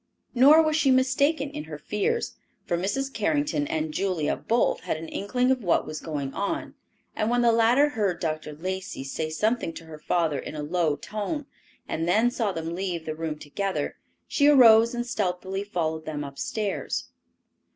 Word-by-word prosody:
Nor 285 +6 +7
was 310 -1 +1
she 300 -3 +3
mistaken 275 +3 +2
in 300 +1 -6
her - - -7
fears; 465 +3 -1 0.3
for 175 - 0
Mrs. 235 +10 -2
Carrington 290 +6 0
and 315 -1 -2
Julia 185 - 0
both 235 +1 +1
had - - -3
an 160 +1 -7
inkling 250 +9 0
of 255 -3 0
what 175 - +2
was 155 0 -6
going 145 -4 -4
on, 200 - -3 0.4
and 215 - 0
when 245 0 +2
the 235 - +5
latter 235 +6 +4
heard 205 -9 -1
Dr. 155 -2 -3
Lacey 185 -1 -5
say 155 +3 -3
something 215 +4 0
to 165 - -10
her 155 -1 -10
father 160 -4 0
in - - -7
a 150 - -4
low 160 -1 +1
tone, 215 - -4 0.4
and 165 +1 -2
then 220 +7 +3
saw 225 -5 -1
them 165 -1 -4
leave 175 -3 -3
the 155 - -3
room 155 -1 -4
together, 190 +7 -3 0.3
she 285 - +3
arose 235 -4 +7
and 240 0 -2
stealthily 195 -4 -2
followed 160 -5 -2
them 150 -2 -4
upstairs. 195 +9 -3
200 Hz, 175 wpm, -26 LUFS, 160-255 Hz, 0.4 s, Nor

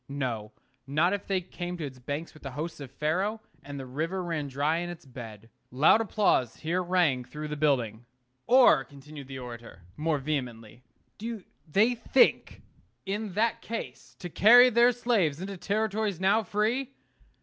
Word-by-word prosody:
No: 120 -6 -3 0.4
not 160 +7 +2
if 205 -1 -4
they 190 -2 0
came 175 0 -6
to 160 - -4
its 130 -2 -9
banks 145 +6 -5
with 155 - -16
the 135 - -6
hosts 160 +3 -5
of 140 -3 -8
Pharaoh, 180 - -1 0.2
and 140 -1 -7
the 135 - -6
river 160 +8 -3
ran 165 -4 -3
dry 145 +4 0
in 175 +1 -3
its 175 -4 -9
bed. 115 -4 -10 0.2
Loud 150 - +4
applause 200 - +1
here 170 +3 -1
rang 175 -8 +1
through 150 +4 -7
the 150 - -3
building. 125 -6 0 0.4
Or, 250 - +6
continued 140 +1 -12
the 135 -1 -7
orator, 120 -7 -10
more 155 0 0
vehemently, 125 -6 -4 0.4
do 225 -2 -5 0.2
they 210 +10 +3
think, 245 +2 +2 0.4
in 205 0 -3
that 220 +3 0
case, 230 - -7
to 180 - -6
carry 245 +8 +7
their 240 +2 +5
slaves 225 -11 0
into 195 +2 -5
territories 210 0 -1
now 195 +4 +3
free? 220 +6 -1
160 Hz, 165 wpm, -28 LUFS, 135-205 Hz, 0.4 s, carry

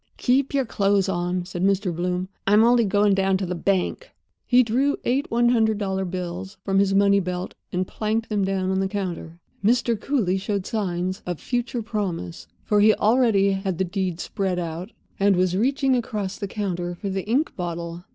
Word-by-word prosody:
"Keep 265 +2 +2
your 270 -2 +2
clothes 200 -3 +1
on," 175 -1 -1
said 180 0 -4
Mr. 195 -2 +1
Bloom. 180 +2 -2 0.2
"I'm 210 +2 +6
only 240 0 +4
going 205 0 +3
down 195 0 +2
to 190 - -3
the 180 - -3
bank." 195 - -1 0.4
He 250 0 +6
drew 260 +5 +1
eight 265 +4 0
one 240 +1 +3
hundred 220 -3 +2
dollar 190 -2 -2
bills 180 +2 -5
from 195 -1 +2
his 195 0 +2
money 200 0 +5
belt 180 -1 -4 0.2
and 180 +1 -1
planked 220 +1 -2
them 205 -2 0
down 190 -1 0
on 190 - +1
the 195 - +1
counter. 180 -4 -5 0.3
Mr. 235 0 +2
Cooly 195 -10 0
showed 200 -1 -2
signs 185 -3 -2
of 175 -3 -3
future 245 -1 -2
promise, 170 - -4 0.2
for 210 - +2
he 215 +1 +6
already 215 -3 +3
had 195 -2 -2
the 190 - +1
deed 185 -2 -2
spread 190 -1 -2
out, 170 +4 -4 0.3
and 200 0 +4
was 180 0 +1
reaching 265 +5 +2
across 210 -5 -3
the 200 - -4
counter 180 -4 -3
for 195 +2 -4
the 190 +1 -3
ink 270 +8 +1
bottle. 170 -1 -5
195 Hz, 190 wpm, -24 LUFS, 180-220 Hz, 0.4 s, I'm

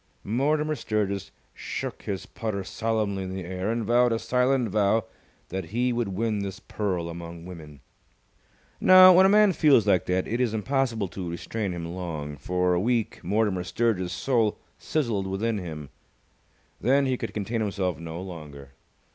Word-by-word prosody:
Mortimer 150 +7 +1
Sturgis 100 -6 -2 0.2
shook - - -5
his 95 -2 -4
putter 105 -4 -4
solemnly 110 -1 -1
in 95 0 -5
the 95 -2 -5
air, 95 +3 -3
and 115 -1 -2
vowed 120 +2 +4
a 115 - +1
silent 125 0 +1
vow 105 +2 +2 0.5
that 95 -1 -4
he 120 +7 0
would 120 -2 -1
win 105 +2 -1
this 100 -1 -5
pearl 95 -5 -3
among 85 0 -8
women. 80 -6 -11 1.0
Now, 185 0 +9
when 190 +2 +7
a - - +3
man 210 -1 +5
feels 140 - +5
like 95 -4 +2
that, 90 +1 0
it 120 +3 -1
is 115 -3 +1
impossible 115 -2 0
to 90 -1 -5
restrain 95 +4 -3
him 85 -1 -5
long. 85 -4 -5
For 90 +5 0
a 90 - +2
week 115 +2 -1
Mortimer 105 -4 +1
Sturgis's 95 -2 0
soul 110 +3 +1 0.2
sizzled 115 -11 -1
within 105 +3 -1
him: 80 -6 -7 0.9
then 135 +3 +3
he 130 -1 +1
could - - -5
contain 110 +2 -2
himself 95 -5 -1
no 85 0 -6
longer. 75 -7 -9
100 Hz, 165 wpm, -26 LUFS, 90-120 Hz, 1.0 s, Now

